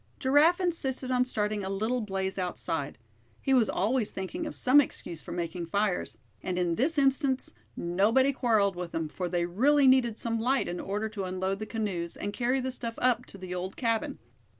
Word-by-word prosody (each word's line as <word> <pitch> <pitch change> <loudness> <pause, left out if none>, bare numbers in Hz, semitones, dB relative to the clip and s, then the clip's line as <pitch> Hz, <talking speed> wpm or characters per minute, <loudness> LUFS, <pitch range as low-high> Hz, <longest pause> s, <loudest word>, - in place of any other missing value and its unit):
Giraffe 295 +7 +4
insisted 270 -8 -1
on 250 0 +3
starting 210 -4 -1
a 190 - -3
little 220 +6 -1
blaze 190 -2 -2
outside. 165 -5 -3 0.4
He 270 - 0
was 245 -4 +4
always 220 +3 +1
thinking 255 - -4
of 300 - -6
some 275 +3 +6
excuse 170 - -6
for - - -9
making 170 0 -3
fires; 200 +1 -1 0.2
and 180 -1 -3
in 175 -2 +1
this 290 - +1
instance 270 - +2 0.2
nobody 220 +11 +3
quarreled 215 -7 +2
with 175 -1 -6
him, 165 -1 -2
for 180 +3 -4
they 175 -1 0
really 270 +11 +3
needed 255 -4 +4
some 230 -1 -1
light 255 +4 +1
in 175 - -4
order 205 +3 -2
to 205 -3 -4
unload 190 +1 -2
the 215 - -5
canoes, 190 -7 -3
and 205 - -4
carry 250 +3 +1
the 260 0 -2
stuff 235 -2 -5
up 250 0 +1
to - - -12
the 185 -1 -6
old 180 +1 -4
cabin. 230 -3 -1
215 Hz, 195 wpm, -29 LUFS, 185-260 Hz, 0.4 s, some